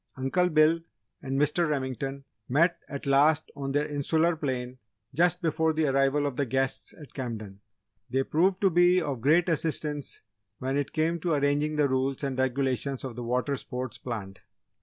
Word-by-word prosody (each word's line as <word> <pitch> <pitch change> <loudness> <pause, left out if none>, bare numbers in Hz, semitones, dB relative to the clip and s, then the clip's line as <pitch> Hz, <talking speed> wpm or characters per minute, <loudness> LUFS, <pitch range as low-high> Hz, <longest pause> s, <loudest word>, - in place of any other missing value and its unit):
Uncle 155 +8 +1
Bill 155 +1 +4 0.4
and 135 0 -2
Mr. 150 +3 +2
Remington 135 -1 -3 0.3
met 165 +7 +3
at 140 0 -6
last 145 +3 +3
on 135 -1 -4
their 145 +2 +1
'insular 160 +3 +1
plane' 130 -4 -4 0.3
just 175 +4 +2
before 160 0 +1
the 155 0 +1
arrival 135 +1 +2
of 140 -3 -3
the 140 - +1
guests 130 +1 -1
at 150 - -13
Camden. 110 -7 -6 0.5
They 135 +2 +1
proved 180 +7 +1
to 195 -2 +4
be 175 +2 +5
of 140 -8 -3
great 160 +7 +4
assistance 150 -3 -1 0.4
when 135 +1 -2
it 145 -1 -1
came 165 +2 0
to 170 0 0
arranging 145 +1 +1
the 150 -1 +3
rules 130 +1 -1
and 135 -2 -1
regulations 130 0 -1
of 130 -3 -6
the 120 - -5
water 125 +4 0
sports 125 -1 -5
planned. 100 -6 -6
140 Hz, 170 wpm, -28 LUFS, 130-160 Hz, 0.5 s, be